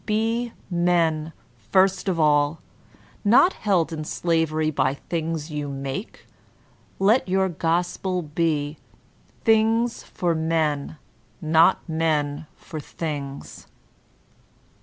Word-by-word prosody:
Be 225 +2 0 0.2
men 170 -3 +1 0.4
first 190 0 +3
of 175 -3 -1
all, 150 0 +3 0.6
not 245 - +5
held 180 -6 0
in 155 -1 -4
slavery 155 -1 0
by 135 -2 +1
the - - -22
things 165 -2 -3
you 150 -1 -3
make; 135 - -6 0.7
let 205 +2 +3
your 190 +1 +2
gospel 175 +2 -1
be, 150 -1 -1 0.7
''Things 225 +1 +2
for 175 -2 -1
men, 160 -2 -1 0.4
not 165 +4 +3
men 155 -2 -1
for 155 - -8
things." 145 -2 -6
165 Hz, 100 wpm, -24 LUFS, 150-185 Hz, 0.7 s, not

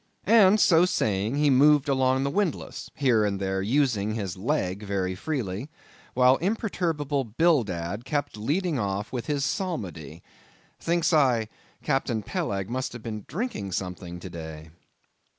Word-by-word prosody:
And 215 -1 +6
so 170 -3 +5
saying, 105 - 0
he 145 0 +3
moved 145 +2 +5
along 130 -1 +2
the 140 - -1
windlass, 195 -3 -2
here 125 -6 +3
and 100 -2 -1
there 95 0 -1
using 110 -2 +1
his 100 -5 -3
leg 100 -3 -1
very 100 -3 -2
freely, 115 0 -4 0.5
while 130 +1 +5
imperturbable 165 -8 -1
Bildad 110 - 0
kept 145 0 -2
leading 150 - -1
off 100 +1 -3
with 125 -2 -4
his 145 -2 0
psalmody. 90 - -4 0.6
Thinks 170 0 +1
I, 125 -8 +3 0.3
Captain 135 -6 0
Peleg 100 - -2
must 130 +3 -3
have 120 -2 -9
been 110 -3 -6
drinking 155 - -4
something 90 -1 -5
to 95 - -7
day. 80 -1 -8
125 Hz, 140 wpm, -26 LUFS, 100-150 Hz, 0.6 s, And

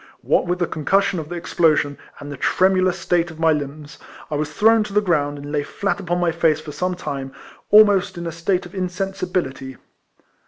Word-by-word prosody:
What - - +2
with 180 +1 0
the 175 - 0
concussion 190 +4 0
of 155 -1 -7
the 175 - -5
explosion, 155 -4 +1 0.2
and 145 0 -8
the - - -5
tremulous 185 +4 +2
state 175 -1 0
of 160 -1 -12
my 165 0 +4
limbs, 150 0 -5 0.3
I - - -1
was 150 0 -2
thrown 225 +3 +4
to 205 - -8
the 210 - +4
ground, 150 -7 0
and 145 0 -8
lay 150 -1 0
flat 200 +7 -3
upon 175 -2 -2
my 175 -1 +1
face 160 -2 +2
for 155 - -8
some 180 +4 -2
time, 135 -6 -5 0.4
almost 200 -3 +5
in 170 - -5
a 165 - -3
state 175 +3 -1
of 175 - -12
insensibility. 180 - -3
175 Hz, 200 wpm, -21 LUFS, 150-185 Hz, 0.4 s, almost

